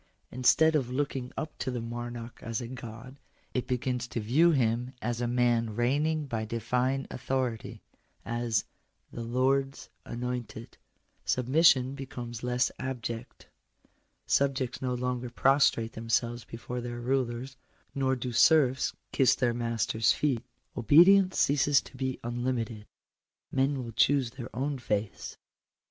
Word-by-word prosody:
Instead 160 +6 +4
of 135 -5 +1
looking 130 -1 -2
up 155 - -4
to - - -2
the 125 -1 -2
monarch 120 0 -6
as 115 -1 -3
a 120 - -5
God, 125 +2 -9 0.3
it 125 -1 -2
begins 125 -1 -1
to 120 - -4
view 135 +11 +4
him 125 -3 +1
as 120 -1 -2
a 120 - 0
man 120 -2 +1
reigning 145 +6 +1
by 115 -5 -3
divine 125 +4 -1
authority 125 -3 -3 0.2
— - - -39 0.2
as 115 -3 0 0.2
" - - -34
the 120 - -5
Lords 135 +3 0
anointed." 120 -2 -5 0.4
Submission 130 0 +3
becomes 125 -4 -7
less 125 +1 +1
abject. 120 -2 -5 0.8
Subjects 135 -3 0
no 125 -1 -1
longer 125 0 -2
prostrate 125 -3 +3
themselves 115 +1 -1
before 120 +2 -6
their 120 0 -5
rulers, 125 +1 -2 0.4
nor 130 -1 +1
do 125 0 -4
serfs 130 +1 +4 0.2
kiss 135 - +4
their 120 -2 +1
masters 115 -2 +1
feet. 135 -6 0 0.3
Obedience 180 - +6
ceases 145 0 +4
to - - -13
be 130 0 -3
unlimited: 120 -2 -3 0.6
men 135 +1 +1
will 115 - -7
ohoose 130 +1 +2
their 125 -2 -8
own 135 +2 -2
faiths. 105 -3 -3
125 Hz, 135 wpm, -29 LUFS, 120-135 Hz, 0.8 s, Obedience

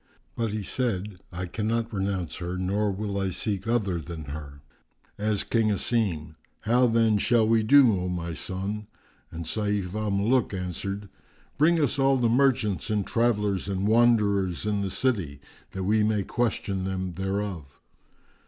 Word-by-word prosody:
But 115 -1 -1
he 105 -1 -3
said, 105 -4 -2
"I 90 +1 -4
cannot 115 +4 -2
renounce 95 -4 -2
her 90 0 -4
nor 100 +3 0
will 100 0 -3
I 95 -1 0
seek 100 +2 -3
other 105 -7 +1
than 80 0 -7
her." 70 -1 -8 0.6
Asked 105 -1 -1
King 115 -2 +3
Asim, 95 -7 -1 0.3
"How 125 +3 +3
then 115 -2 +3
shall 115 0 +3
we 115 0 +4
do, 130 +1 +6
O 90 - -2
my 85 -1 -3
son?"; 100 +5 -4 0.4
and 85 0 -7
Sayf 100 0 -1
al 110 0 -2
Muluk 105 +3 +1
answered, 100 +3 -4 0.5
"Bring 165 +3 +4
us 140 -2 +1
all 135 0 +4
the 120 -2 +2
merchants 120 - +2
and 105 -2 0
travellers 105 -5 +1
and 95 +1 -1
wanderers 105 -6 +3
in 105 -1 0
the 100 - -1
city, 95 - -1 0.3
that 95 - -3
we 105 +3 +2
may 105 -2 +1
question 100 -4 -1
them 95 -1 -3
thereof. 95 -6 -4
100 Hz, 155 wpm, -26 LUFS, 95-115 Hz, 0.6 s, do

